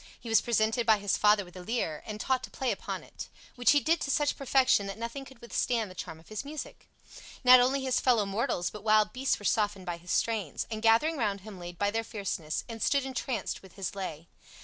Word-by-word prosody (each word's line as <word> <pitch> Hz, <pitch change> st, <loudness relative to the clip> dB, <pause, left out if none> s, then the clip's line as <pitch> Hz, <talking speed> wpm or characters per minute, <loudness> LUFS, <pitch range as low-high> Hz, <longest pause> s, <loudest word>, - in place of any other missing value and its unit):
He 235 Hz, -, -9 dB
was 225 Hz, -2 st, +5 dB
presented 230 Hz, 0 st, +1 dB
by 220 Hz, -1 st, +6 dB
his 200 Hz, -1 st, 0 dB
father 210 Hz, -1 st, +4 dB
with 175 Hz, -, -16 dB
a 180 Hz, -, -8 dB
Lyre 180 Hz, -8 st, -2 dB
and 215 Hz, -1 st, -5 dB
taught 260 Hz, +3 st, 0 dB
to -, -, -16 dB
play 260 Hz, -2 st, -1 dB
upon -, -, -4 dB
it, -, -, -9 dB, 0.3 s
which 245 Hz, -1 st, +2 dB
he 290 Hz, -, +6 dB
did 325 Hz, +4 st, +1 dB
to -, -, -2 dB
such 290 Hz, +1 st, +1 dB
perfection 260 Hz, -6 st, +3 dB
that 195 Hz, -, -6 dB
nothing 235 Hz, +4 st, -5 dB
could 265 Hz, -2 st, -15 dB
withstand 235 Hz, -3 st, -1 dB
the -, -, -10 dB
charm 160 Hz, -2 st, -7 dB
of 160 Hz, -, -19 dB
his 215 Hz, +3 st, -4 dB
music. 290 Hz, +1 st, -8 dB, 0.5 s
Not 250 Hz, 0 st, +9 dB
only 265 Hz, +2 st, +2 dB
his 260 Hz, -1 st, +1 dB
fellow 235 Hz, -5 st, +3 dB
mortals 195 Hz, -3 st, -1 dB
but 210 Hz, -1 st, -9 dB
wild 215 Hz, -1 st, +4 dB
beasts 265 Hz, +1 st, 0 dB
were 205 Hz, -, -10 dB
softened 205 Hz, -4 st, +1 dB
by 175 Hz, -2 st, -3 dB
his 175 Hz, +1 st, -15 dB
strains, 210 Hz, -4 st, 0 dB
and 215 Hz, -1 st, -3 dB
gathering 230 Hz, +9 st, +4 dB
round 205 Hz, -5 st, -1 dB
him 200 Hz, -2 st, -10 dB
laid 175 Hz, 0 st, -8 dB
by 205 Hz, +2 st, +1 dB
their 225 Hz, +1 st, -1 dB
fierceness, 195 Hz, -8 st, -3 dB
and 225 Hz, -1 st, -8 dB
stood 280 Hz, -2 st, +2 dB
entranced 260 Hz, -2 st, -3 dB
with 190 Hz, -2 st, -16 dB
his 195 Hz, -2 st, -4 dB
lay. 170 Hz, -5 st, -6 dB
220 Hz, 235 wpm, -29 LUFS, 195-250 Hz, 0.5 s, Not